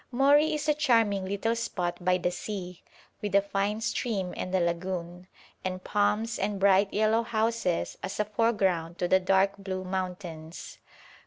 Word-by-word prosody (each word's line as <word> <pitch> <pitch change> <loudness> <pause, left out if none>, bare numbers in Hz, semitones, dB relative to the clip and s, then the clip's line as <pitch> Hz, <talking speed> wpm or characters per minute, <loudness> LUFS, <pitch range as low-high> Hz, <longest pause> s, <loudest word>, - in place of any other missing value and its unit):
Mori 285 +5 +4
is 300 0 -3
a 300 - +5
charming 230 -10 +2
little 200 +4 -1
spot 180 -6 -3
by 180 0 +3
the 180 0 -1
sea, 180 -2 -6 0.4
with 205 -2 -2
a 200 - +7
fine 200 +2 -1
stream 215 -5 -2
and 185 - -4
a - - +3
lagoon, 175 +1 -3 0.4
and 185 0 -4
palms 210 +2 0
and 200 0 -1
bright 195 0 +4
yellow 220 +2 +2
houses 225 -5 -1
as 190 - -5
a 210 - +2
foreground 195 -6 0
to 175 - 0
the 190 - +4
dark 195 +1 +2
blue 190 -1 -4
mountains. 180 -3 -6
195 Hz, 160 wpm, -28 LUFS, 180-220 Hz, 0.4 s, a